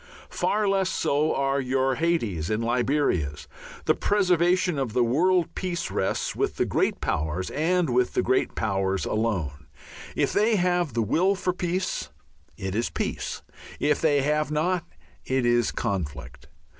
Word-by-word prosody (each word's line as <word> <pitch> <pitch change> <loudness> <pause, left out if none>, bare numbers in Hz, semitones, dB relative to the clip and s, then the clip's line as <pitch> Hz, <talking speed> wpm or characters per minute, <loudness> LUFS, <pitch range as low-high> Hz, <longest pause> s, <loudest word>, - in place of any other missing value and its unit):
Far 210 0 0
less 195 -1 +2
so 150 -1 +1
are 135 0 +1
your 130 0 0
Haytis 115 - 0
and 110 +1 0
Liberias. 120 - 0 0.4
The - - +4
preservation 180 -4 +2
of 125 -5 -2
the 125 - +3
world 170 +8 +2
peace 175 -2 -3
rests 95 - -1
with - - -1
the - - +1
great - - 0
powers 80 +4 -2
and 170 +3 +1
with 125 -1 +1
the - - +2
great 130 +1 +1
powers 95 -3 0
alone. 90 -10 -2 0.5
If - - +1
they 215 +2 +3
have 175 - +1
the 115 - +2
will 180 - +2
for 185 -1 -1
peace, 180 - -2 0.5
it 95 -1 -4
is 115 +3 0
peace. - - -4 0.4
If 150 - +1
they 145 -4 +3
have 150 +1 +1
not, 165 +3 0 0.4
it 130 -1 0
is 120 0 +3
conflict. 80 -10 -4
135 Hz, 150 wpm, -26 LUFS, 110-175 Hz, 0.5 s, The